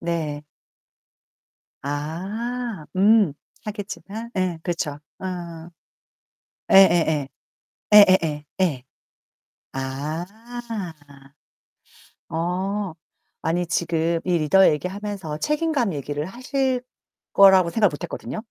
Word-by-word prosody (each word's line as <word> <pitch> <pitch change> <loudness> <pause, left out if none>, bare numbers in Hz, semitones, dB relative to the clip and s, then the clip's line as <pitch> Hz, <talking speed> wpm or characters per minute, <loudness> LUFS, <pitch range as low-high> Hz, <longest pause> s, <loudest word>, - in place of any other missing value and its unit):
네. 160 -3 -2 1.4
아. 190 +8 -4
음. 205 -3 +5 0.3
하겠지만 210 +1 -6
예. 180 -3 0
그렇죠. 165 -4 -2 0.2
어어. 175 -3 -6 1.0
예예예. 160 -7 +5 0.7
예예예 185 -7 +6 0.2
예. 145 -9 +1 0.9
아. 140 +5 -3 2.0
어. 185 +3 -2 0.5
아니 175 +3 0
지금 170 -1 0
이 180 -2 +2
리더 175 +5 +5
얘기하면서 190 0 -4
책임감 300 - 0
얘기를 145 +1 -3
하실 255 - -1 0.5
거라고 190 -3 +7
생각을 210 0 +3
못 145 - -8
했거든요. - - -6
175 Hz, 170 characters per minute, -23 LUFS, 160-205 Hz, 2.0 s, 거라고